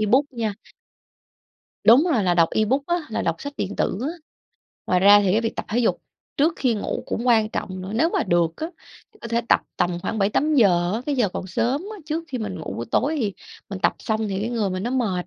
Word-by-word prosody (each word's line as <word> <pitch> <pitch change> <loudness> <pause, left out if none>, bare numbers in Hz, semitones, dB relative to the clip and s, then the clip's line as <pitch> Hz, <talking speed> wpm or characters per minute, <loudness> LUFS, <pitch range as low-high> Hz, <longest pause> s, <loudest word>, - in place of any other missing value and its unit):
ebook 260 +7 +2
nha. 220 -4 -2 1.3
Đúng 245 +9 +7
rồi, 225 -6 +2
là 175 -1 +2
đọc 165 -1 +4
ebook 260 +6 +1
á, 345 0 +1
là - - -2
đọc 165 -1 0
sách 285 - -6
điện 200 +1 -3
tử. 190 - 0 0.9
Ngoài 180 - +2
ra 205 +2 +8
thì 190 -2 +2
cái 220 - +3
việc 225 - -3
tập - - -3
thể 225 +4 0
dục 240 - +2 0.4
trước 315 +4 +3
khi 245 -4 +1
ngủ 205 - -3
cũng 240 - -3
quan 220 -3 +4
trọng 185 -3 -4
nữa, 190 - -6
nếu 320 +9 +3
mà - - +1
được 170 -3 +1
á 320 - -3 0.5
thì - - -22
có 235 - -6
thể 235 +1 +1
tập - - +5 0.2
tầm 175 -1 0
khoảng 220 - -3
7:00-8:00, 205 - +2
cái 285 -2 0
giờ 225 -6 +2
còn 185 - -6
sớm 245 - 0
á. 420 - -9
Trước 320 +2 -2
khi 255 - -4
mình 200 -5 -4
ngủ 160 - -6
buổi 115 - -4
tối 300 +6 +1
thì 205 -4 -1 0.4
mình 195 - -4
tập - - +2
xong 220 -1 -2
thì 195 0 -2
cái 225 - -2
người 220 -5 -1
mình 185 +1 -3
nó 240 - -2
mệt, 210 -9 -1
220 Hz, 235 wpm, -23 LUFS, 190-250 Hz, 1.3 s, ra